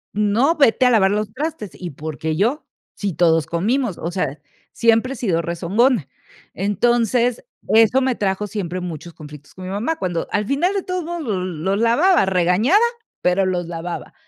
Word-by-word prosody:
"No, 215 +10 +2
vete 260 -3 +4
a - - +6
lavar 195 -4 +4
los 210 0 -1
trastes". 260 - -4
"¿Y 175 -3 -7
por 150 +2 -7
qué 155 0 -2
yo? 240 +10 0 0.3
Sí, 200 -3 -3
todos 165 -1 +3
comimos", 215 +4 -1
o 170 - -4
sea, 150 -6 -3 0.3
siempre 230 +3 +2
he - - -7
sido 180 -8 0
rezongona. 180 - +1 0.5
Entonces, 235 - +1 0.2
eso 225 +4 +5
me 260 -1 +1
trajo 200 0 -1
siempre 185 -3 -4
muchos 170 -1 -7
conflictos 150 -2 -13
con 185 - -9
mi 185 - -5
mamá, 230 +12 -2
cuando 175 -3 -2
al 210 - 0
final 305 - +1
de 395 - -2
todos 365 -1 -3
modos 345 +1 -5
los 190 -5 -2
los 185 +3 -2
lavaba, 295 - +4
regañada, 190 - +3 0.4
pero 180 +2 +2
los 180 -2 -1
lavaba. 170 0 -6
205 Hz, 175 wpm, -20 LUFS, 175-245 Hz, 0.5 s, a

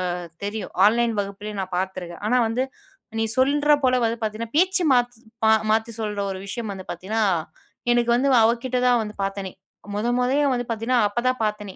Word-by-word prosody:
அ - - -4 0.3
தெரியும், 210 +1 -5
ஆன்லைன் 230 +2 +3
வகுப்புலயே 205 +1 -5
நான் 185 -1 -5
பாத்துருக்கேன். 185 -2 -4
ஆனா 250 +2 +3
வந்து 235 +3 0 0.6
நீ - - +2
சொல்ற 290 +3 +3
போல 255 -1 +3
வந்து 230 +1 -1
பாத்தீங்கன்னா, 220 +2 -4
பேச்சு 370 +1 +3
மாத் 245 -1 +1 0.5
மாத்தி 225 +1 +1
சொல்ற 210 -1 -3
ஒரு 190 - -5
விஷயம் 220 0 -4
வந்து 190 -1 -9
பாத்தீங்கன்னா, 205 +6 -2 0.7
எனக்கு 240 0 +1
வந்து 275 +3 +2
அவகிட்ட 240 +2 +1
தான் 245 -1 +4
வந்து 210 0 -8
பாத்தனே. 195 -1 -3 0.4
மொத 210 +3 -1
மொதய்யே 265 +4 +2
வந்து 245 -1 -2
பாத்தீங்கன்னா 230 +2 +1
அப்போ 205 +3 -3
தான் 255 0 +1
பாத்தேனே. 210 -2 -3
225 Hz, 175 wpm, -23 LUFS, 205-245 Hz, 0.7 s, தான்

